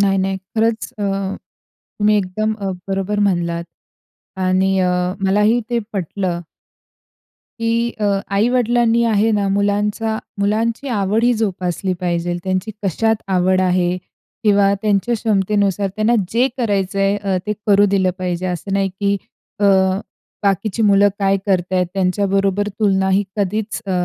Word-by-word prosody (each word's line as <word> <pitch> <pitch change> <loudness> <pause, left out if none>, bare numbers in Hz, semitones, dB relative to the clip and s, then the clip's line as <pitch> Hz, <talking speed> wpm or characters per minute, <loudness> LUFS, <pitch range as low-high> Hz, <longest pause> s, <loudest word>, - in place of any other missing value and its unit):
नाही, 195 -1 +3
नाही. 190 0 0 0.2
खरंच 225 0 +1
अ, - - -3 1.0
तुम्ही 210 0 +3
एकदम 215 +3 -1
अ, 195 -1 -2 0.2
बरोबर 195 +2 -1
म्हणलात 175 -4 0 0.8
आणि 190 +1 +2
अ, 180 - +2 0.4
मलाही 210 +5 +3
ते 240 - +1
पटलं 185 -1 -2 1.2
की 230 +1 +1
अ, 210 - +1 0.3
आई-वडिलांनी 235 +1 +2
आहे 220 0 +2
ना, 205 -1 +1
मुलांचा 205 +2 0 0.2
मुलांची 225 +6 0
आवडही 225 +2 +2
जोपासली 185 -2 -1
पाहिजेल. 175 -1 -1
त्यांची 190 +3 -1
कशात 220 +4 +1 0.2
आवड 185 +1 +3
आहे 180 -1 +1 0.5
किंवा 200 -1 +4
त्यांच्या 210 +3 +1
क्षमतेनुसार 200 -2 +1
त्यांना 215 +3 +2 0.2
जे 250 +3 +3
करायचंय, 195 -2 +1
अ, 195 -2 -1
ते 210 - 0
करू 205 0 +5
दिलं 190 -2 +2
पाहिजे. 180 0 -2
असं 180 +2 -4
नाही 195 0 +1
की 200 0 +2 0.4
अ, - - +2 0.8
बाकीची 200 +3 0
मुलं 200 -1 +5
काय 195 0 +2
करत 185 -1 0
आहेत? 180 -1 +2
त्यांच्याबरोबर 195 +1 +1
तुलना 190 -2 +2
ही 195 +2 +3
कधीच 210 +3 -2
अ, - - -3
200 Hz, 130 wpm, -19 LUFS, 190-215 Hz, 1.2 s, करू